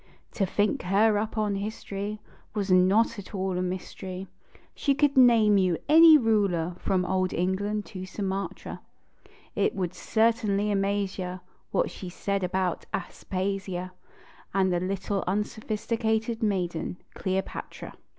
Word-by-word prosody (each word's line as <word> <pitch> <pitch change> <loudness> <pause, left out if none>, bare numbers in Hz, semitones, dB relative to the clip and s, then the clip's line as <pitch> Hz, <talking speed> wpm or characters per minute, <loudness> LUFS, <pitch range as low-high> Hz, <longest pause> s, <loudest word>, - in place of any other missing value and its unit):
To 195 - 0
think 210 +8 +1
her 205 +3 +3
up 220 +1 -4
in 210 -1 +1
history 205 0 -4 0.4
Was 200 -2 -1
not 200 +5 +4
at 200 +1 -9
all 190 -1 -1
a - - 0
mystery; 185 +1 -5 0.5
She 280 -2 +1
could 290 0 +2
name 230 -5 +6
you 180 -3 +2
any 320 +1 +9
ruler 200 - +1
from 185 -1 0
old 185 0 0
England 200 +4 -1
to 185 -1 -6
Sumatra. 195 0 -4 0.7
It - - +1
would 180 -3 -2
certainly 220 -2 +1
amaze 200 0 0
you 180 0 -4 0.3
What - - 0
she 185 - -7
said 200 +2 -2
about 180 -1 -1
Aspasia 190 0 -3 0.6
And 190 -2 +3
the 175 - +1
little 195 +2 -2
unsophisticated 220 +3 -1
maiden, 180 -5 -1 0.2
Cleopatra. 190 0 -4
195 Hz, 130 wpm, -27 LUFS, 185-215 Hz, 0.7 s, any